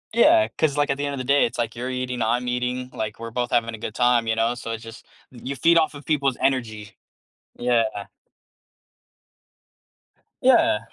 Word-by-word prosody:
Yeah, 325 +7 +5
'cause 150 -3 +1
like 145 -1 +2
at 135 - -1
the 145 - -2
end 140 - -3
of - - -8
the 130 - -3
day, 140 +2 +3
it's 115 - -5
like 115 -1 -2
you're 125 +2 -4
eating, 125 -1 -3
I'm 120 +3 0
eating, 125 +1 -2
like 110 -1 -5
we're 115 0 -7
both 120 0 -2
having 115 -1 0
a 110 - -8
good 110 0 -6
time, 120 -2 +2
you 110 - +1
know, 115 +2 +1
so 120 - -8
it's 115 0 -5
just, 115 +1 -11 0.3
y 125 - -13
you 140 +2 -4
feed 165 +6 +4
off 155 -2 0
of 145 - -11
people's 140 -4 0
energy. 110 -5 -2 0.6
Yeah. 120 -2 +2 2.6
Yeah. 105 - +4
125 Hz, 200 wpm, -23 LUFS, 115-135 Hz, 2.6 s, Yeah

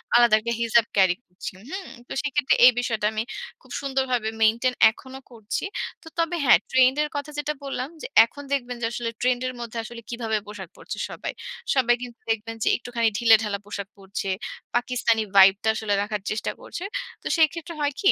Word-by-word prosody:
আলাদা 240 -2 +7
একটা 235 +2 -2
হিজাব 230 0 +4
ক্যারি 190 -2 +4
করছি, 180 +1 -8 0.2
হু? - - -4 0.3
তো - - -6
সেক্ষেত্রে 290 -1 +2
এই 250 - +10
বিষয়টা 225 -4 -1
আমি 215 +1 -1 0.4
খুব - - -19
সুন্দরভাবে 265 -4 0
মেইনটেইন 235 +3 +3 0.2
এখনো 260 +3 -11
করছি। 220 -3 -4 0.4
তো - - -14
তবে 335 +1 +1
হ্যাঁ, - - +7
ট্রেন্ডের 260 +3 +4
কথা 285 +1 -4
যেটা 295 +1 -1
বললাম, 270 -1 -3
যে - - -5 0.2
এখন 285 +5 -11
দেখবেন 245 -3 -1
যে - - 0
আসলে 235 -1 -3
ট্রেন্ডের 255 0 +1
মধ্যে 235 -1 -6
আসলে 235 +1 -9
কিভাবে 225 -2 -1
পোশাক 195 -4 -8
পরছে - - -7
সবাই। - - -5 0.4
সবাই 240 -2 +4
কিন্তু 245 -1 -8
দেখবেন 225 +1 -3
যে - - -1
একটুখানি 235 -2 0
ঢিলেঢালা 220 -4 +4
পোশাক 200 -1 -5
পরছে। 195 0 -5 0.5
পাকিস্তানি 240 -2 +1
ভাইবটা 195 +2 +6
আসলে 220 -2 -1
রাখার 205 -1 -3
চেষ্টা 215 - -3
করছে। 350 - -7 0.4
তো - - -3
সেক্ষেত্রে 330 +2 +1
হয় 290 -1 +1
কি? 395 - +6
235 Hz, 175 wpm, -24 LUFS, 220-260 Hz, 0.5 s, এই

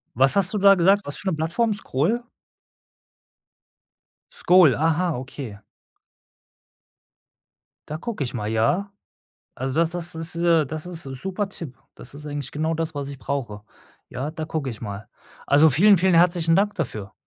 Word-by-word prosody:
Was 135 - +4
hast 190 -2 +3
du 210 - -1
da 195 0 +7
gesagt? 195 +3 +3
Was 145 - -5
für 200 - -5
'ne 185 - +1
Plattform, 170 +9 0
Skool? 200 - -1 2.1
Skool, 175 -8 +5
aha, 165 0 0
okay. 130 -4 -8 2.3
Da 155 - -4
gucke 205 - -4
ich 120 - -6
mal, 105 -3 -3
ja. 175 - 0 0.6
Also, 130 +1 -4
das 165 0 +2
das 175 -1 -3
ist 165 0 -2
äh, 170 -3 +3
das 155 +4 -6
ist 170 -2 -5
super 185 +10 -4
Tipp. 160 -9 -8 0.2
Das - - -11
ist 150 +1 -10
eigentlich 145 -2 -5
genau 160 +2 -1
das, 160 0 -3
was 140 -1 -4
ich 140 - -8
brauche. 120 -8 -4 0.5
Ja, 135 +4 -4
da 155 0 -5
gucke 155 -4 -3
ich 110 - -10
mal. 105 -1 -7 0.4
Also, 150 +3 +5
vielen, 195 +8 +5
vielen 185 +1 +2
herzlichen 170 -1 +3
Dank 205 +1 +1
dafür. 110 - -5
160 Hz, 160 wpm, -23 LUFS, 135-180 Hz, 2.3 s, da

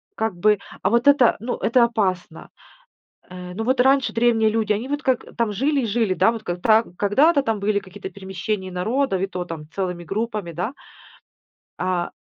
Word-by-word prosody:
как 220 -4 -2
бы, 210 +3 +3 0.2
а 190 - +3
вот 235 +3 +2
это, 280 -4 +5
ну, 235 +4 -3
это 235 +1 +3
опасно. 185 -8 -2 0.8
Э, 180 0 -9
ну 225 - -3
вот 255 +1 +1
раньше 270 +1 +3
древние 230 -1 +3
люди, 220 -1 +1
они 220 +5 -3
вот 290 +2 -3
как 260 -3 0
там, 230 -3 0
жили 275 +6 0
и - - -1
жили, 220 -3 0
да, 225 - +3
вот 225 -2 -7
как 175 -3 -4
тра 225 0 +5
когда-то 280 +10 +3
там 225 -5 -1
были 205 0 +1
какие-то 195 0 -9
перемещения 190 0 -5
народов, 210 +3 0
и - - +1
то 180 -1 -4
там 165 -3 -7
целыми 180 -3 -3
группами, 210 -1 -3
да. 180 +9 -3 1.1
А 180 -1 -1
215 Hz, 185 wpm, -22 LUFS, 185-235 Hz, 1.1 s, это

